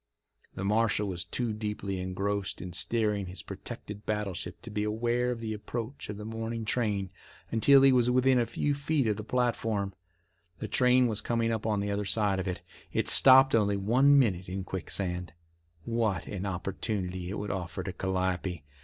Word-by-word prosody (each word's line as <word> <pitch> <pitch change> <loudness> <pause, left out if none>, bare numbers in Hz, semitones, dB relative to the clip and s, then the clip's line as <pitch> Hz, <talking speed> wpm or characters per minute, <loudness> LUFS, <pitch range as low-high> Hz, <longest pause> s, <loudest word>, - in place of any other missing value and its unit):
The 95 - -4
marshal 105 0 +2
was 90 -3 -3
too 120 -3 -2
deeply 105 -3 -3
engrossed 95 +2 -2
in 90 -1 -7
steering 105 0 0
his 90 +2 -6
protected 105 0 -8
battleship 100 -4 -3
to 115 - -7
be 105 0 -1
aware 120 +3 0
of 120 -2 -2
the 110 -1 -3
approach 115 +4 -6
of 105 - -5
the 105 - -7
morning 115 0 -4
train 105 -5 -1 0.4
until 135 +5 +6
he 135 - +7
was 125 -1 +3
within 130 +1 +4
a 120 - +1
few 145 +5 0
feet 145 -1 0
of 105 -2 +1
the 110 - -5
platform. 110 -4 -1 0.6
The - - -5
train 125 0 +4
was 110 -3 -1
coming 115 +1 0
up 110 -1 -2
on 105 -2 +1
the 100 0 -2
other 100 0 -1
side 100 -1 +1
of 95 - -3
it. 90 -2 -4 0.3
It - - +1
stopped 135 0 +7
only 100 -3 +3
one 130 +8 +4
minute 95 -9 +2
at 95 0 -4
Quicksand. 90 -2 -4 0.5
What 115 -4 0
an 100 0 -4
opportunity 95 -1 -3
it 100 - -4
would 105 0 -3
offer 90 -3 -4
to 95 - -5
Calliope! 95 -3 -2
105 Hz, 180 wpm, -29 LUFS, 95-115 Hz, 0.6 s, he